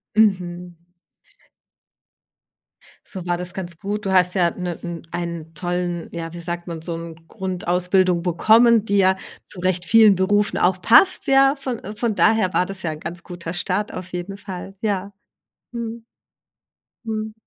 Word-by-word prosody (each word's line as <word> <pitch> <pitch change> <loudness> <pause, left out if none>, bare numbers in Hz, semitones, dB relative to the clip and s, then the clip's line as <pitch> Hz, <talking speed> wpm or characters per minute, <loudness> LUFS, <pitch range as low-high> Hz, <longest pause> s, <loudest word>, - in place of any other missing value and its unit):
Mhm. 180 -5 +1 2.3
So 190 -3 -7
war 175 0 +1
das 180 +1 -4
ganz 175 -3 -5
gut. 205 +3 -4
Du - - 0
hast 180 -1 +4
ja, 175 -3 +3
ne 180 -2 -4
n 170 -2 -7
einen 170 -2 -5
tollen 175 +1 -3
ja, 165 -1 -6
wie 175 - -7
sagt 175 0 -4
man, 165 -2 -6
so 165 +1 -3
'n 165 0 -9
Grundausbildung 180 -2 0
bekommen, 220 +6 +5
die 200 -1 +1
ja 190 -1 +4 0.3
zurecht 180 -1 -2
vielen 220 +1 +6
Berufen 205 +3 +1
auch 180 +1 +2
passt, 370 - +5
ja. 270 +1 +5
Von 260 -4 -5
von 215 0 -1
daher 210 -3 +3
war 180 - +3
das 190 0 -7
ja 170 - -2
'n 155 - -7
ganz 170 +3 -7
guter 175 -2 -7
Start 205 +4 -2
auf 185 0 -7
jeden 180 +3 -5
Fall, 195 -1 -8
ja. 200 -2 -1 0.6
Mhm. 235 -1 -6 1.0
Mhm. 220 -1 -3
185 Hz, 155 wpm, -22 LUFS, 175-205 Hz, 2.3 s, vielen